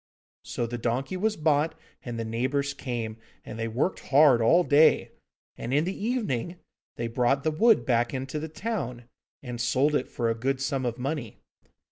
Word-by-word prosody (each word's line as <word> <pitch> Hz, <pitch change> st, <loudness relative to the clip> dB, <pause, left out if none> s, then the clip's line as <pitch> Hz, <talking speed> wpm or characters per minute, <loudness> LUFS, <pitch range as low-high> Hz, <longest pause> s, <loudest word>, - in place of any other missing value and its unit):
So 120 Hz, -, -3 dB
the 120 Hz, +1 st, -5 dB
donkey 125 Hz, +9 st, -1 dB
was 215 Hz, +3 st, 0 dB
bought, 155 Hz, 0 st, +1 dB, 0.3 s
and 120 Hz, -2 st, -5 dB
the 115 Hz, -, -3 dB
neighbours 130 Hz, +5 st, -1 dB
came, 115 Hz, -4 st, -4 dB, 0.3 s
and 110 Hz, -, -8 dB
they 115 Hz, -, -1 dB
worked 125 Hz, +11 st, -1 dB
hard 140 Hz, -4 st, +6 dB
all 170 Hz, +11 st, +5 dB
day, 155 Hz, 0 st, +4 dB, 0.5 s
and 125 Hz, +4 st, -2 dB
in 150 Hz, -, +3 dB
the 190 Hz, -, -3 dB
evening 200 Hz, -, -2 dB, 0.4 s
they 120 Hz, -, -3 dB
brought 125 Hz, +4 st, +1 dB
the 155 Hz, -, +1 dB
wood 225 Hz, +8 st, +4 dB
back 120 Hz, -1 st, +2 dB
into 135 Hz, +3 st, -4 dB
the 160 Hz, +1 st, -5 dB
town, 155 Hz, -, -4 dB, 0.4 s
and 120 Hz, -2 st, -5 dB
sold 130 Hz, +5 st, +2 dB
it 145 Hz, -, 0 dB
for 120 Hz, -, -2 dB
a 115 Hz, -, +2 dB
good 130 Hz, +4 st, -1 dB
sum 135 Hz, -2 st, -1 dB
of 120 Hz, 0 st, -3 dB
money. 135 Hz, -2 st, -4 dB
135 Hz, 180 wpm, -27 LUFS, 120-155 Hz, 0.5 s, hard